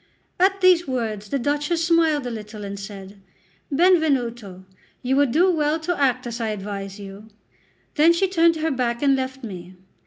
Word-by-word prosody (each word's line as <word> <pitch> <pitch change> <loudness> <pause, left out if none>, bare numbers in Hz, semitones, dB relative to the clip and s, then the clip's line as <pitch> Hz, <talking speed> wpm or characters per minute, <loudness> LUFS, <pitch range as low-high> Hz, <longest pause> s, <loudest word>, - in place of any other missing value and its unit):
At 385 +1 +2
these 360 -3 +4
words 220 -5 -3
the 280 - 0
Duchess 295 +5 -1
smiled 325 -4 +2
a 245 - -4
little 215 -1 -8
and 200 0 -6
said: 195 0 -10 0.5
"Benvenuto, 260 - +1 0.4
you 260 +2 +1
would 285 -2 +3
do 360 +7 +3
well 310 -1 0
to 350 +2 -2
act 255 -2 +1
as 235 0 -5
I 225 - -1
advise 200 -1 -5
you." 200 +2 -10 0.7
Then 320 +2 +5
she 340 +3 +1
turned 335 -3 +3
her 320 0 -1
back 245 -1 -2
and 275 -1 +4
left 260 0 -4
me. 185 -4 -9
260 Hz, 175 wpm, -22 LUFS, 210-320 Hz, 0.7 s, Then